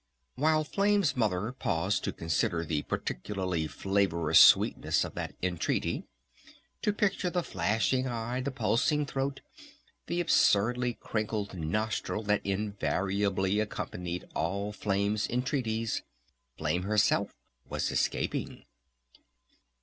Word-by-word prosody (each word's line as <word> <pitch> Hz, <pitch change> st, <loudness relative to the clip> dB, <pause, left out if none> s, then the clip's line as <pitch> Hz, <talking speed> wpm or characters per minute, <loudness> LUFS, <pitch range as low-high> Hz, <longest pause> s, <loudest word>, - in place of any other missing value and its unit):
While 155 Hz, +2 st, +2 dB
Flame's 200 Hz, 0 st, +2 dB
Mother 105 Hz, -2 st, 0 dB
paused 95 Hz, -6 st, -1 dB
to -, -, -1 dB
consider 85 Hz, 0 st, -1 dB
the 75 Hz, -1 st, -1 dB
particularly 90 Hz, +2 st, -2 dB
flavorous 95 Hz, -4 st, +2 dB
sweetness -, -, +5 dB
of -, -, -6 dB
that -, -, -5 dB
entreaty, 90 Hz, -2 st, -1 dB, 0.8 s
to 210 Hz, -, +2 dB
picture 200 Hz, -3 st, 0 dB
the 175 Hz, 0 st, -1 dB
flashing 110 Hz, -, 0 dB
eye, 120 Hz, +1 st, -2 dB
the 135 Hz, -, -2 dB
pulsing 140 Hz, +2 st, +1 dB
throat, 135 Hz, 0 st, -3 dB, 0.7 s
the 170 Hz, -, -1 dB
absurdly 125 Hz, -6 st, +3 dB
crinkled 105 Hz, -2 st, -3 dB
nostril 105 Hz, +6 st, -2 dB
that 105 Hz, 0 st, +1 dB
invariably 100 Hz, 0 st, 0 dB
accompanied 90 Hz, -4 st, -4 dB
all 100 Hz, +5 st, -1 dB
Flame's 100 Hz, +1 st, 0 dB
entreaties, 120 Hz, -3 st, -1 dB, 0.6 s
Flame 85 Hz, +4 st, 0 dB
herself 105 Hz, +2 st, +2 dB, 0.3 s
was -, -, -1 dB
escaping! -, -, -1 dB
105 Hz, 105 wpm, -30 LUFS, 95-125 Hz, 0.8 s, sweetness